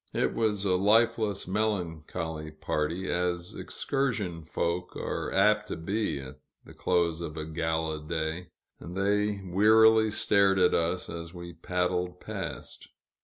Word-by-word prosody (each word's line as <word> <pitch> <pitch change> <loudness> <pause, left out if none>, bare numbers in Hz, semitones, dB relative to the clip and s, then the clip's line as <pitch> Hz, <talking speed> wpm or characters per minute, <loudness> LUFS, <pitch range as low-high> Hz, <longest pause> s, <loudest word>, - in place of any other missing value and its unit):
It - - +1
was 105 -3 0
a 90 -2 +3
lifeless, 105 0 +3
melancholy 85 -6 -2
party, 75 +4 -2
as 90 0 -1
excursion 105 - -2
folk 85 +3 -2
are - - -3
apt 105 +2 +3
to - - -4
be 100 -1 -2
at 65 -1 -10 0.3
the - - -13
close 85 -2 0
of 80 -2 -6
a 80 - -3
gala 80 -1 -2
day, 80 +2 -3 0.3
and 90 +2 -8
they 105 +1 +1
wearily 110 +4 +5
stared 100 -2 +3
at 90 -1 +4
us 85 +2 0
as 85 +1 -7
we 85 0 -8
paddled 90 0 -2
past. - - -6
90 Hz, 135 wpm, -28 LUFS, 80-105 Hz, 0.3 s, wearily